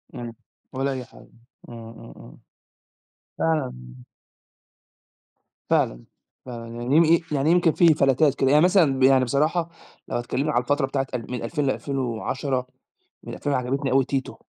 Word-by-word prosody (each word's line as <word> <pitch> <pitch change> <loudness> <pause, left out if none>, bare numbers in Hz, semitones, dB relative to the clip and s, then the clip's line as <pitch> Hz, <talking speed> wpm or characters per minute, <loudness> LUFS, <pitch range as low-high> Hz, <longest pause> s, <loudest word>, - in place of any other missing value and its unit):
إم، 120 -1 -6
م 115 - -9 0.4
ولا 135 +1 -1
أي 130 -2 -5
حاجة. - - -18 0.4
إمم، 115 -1 -10
إمم، 115 - -13
إمم. - - -14 1.0
فعلًا 155 -5 0 2.0
فعلًا، - - +1 0.4
فعلًا. 120 -2 -8
يعني 130 +5 0
يم 165 +1 +5
يعني 145 +3 +1
يمكن 175 -2 +4
في 165 -1 +5
فلتات 140 0 +2
كده 135 0 +1
يعني 150 +2 +5
مثلًا 160 -8 +3
يعني 130 -1 +5
بصراحة 155 +7 0 0.4
لو - - -2
هتكلمني 135 +5 -2
على 120 - +2
الفترة 145 +2 +1
بتاعة 135 -1 -2
ال 125 0 -5
من 125 -2 -4
2000 145 +3 -2
ل2010، 130 0 -2 0.6
من - - -8
2000 145 - -2
عجبتني 135 +1 -1
أوي 135 0 +3
تيتو. 135 0 -4
135 Hz, 150 wpm, -24 LUFS, 125-150 Hz, 2.0 s, يم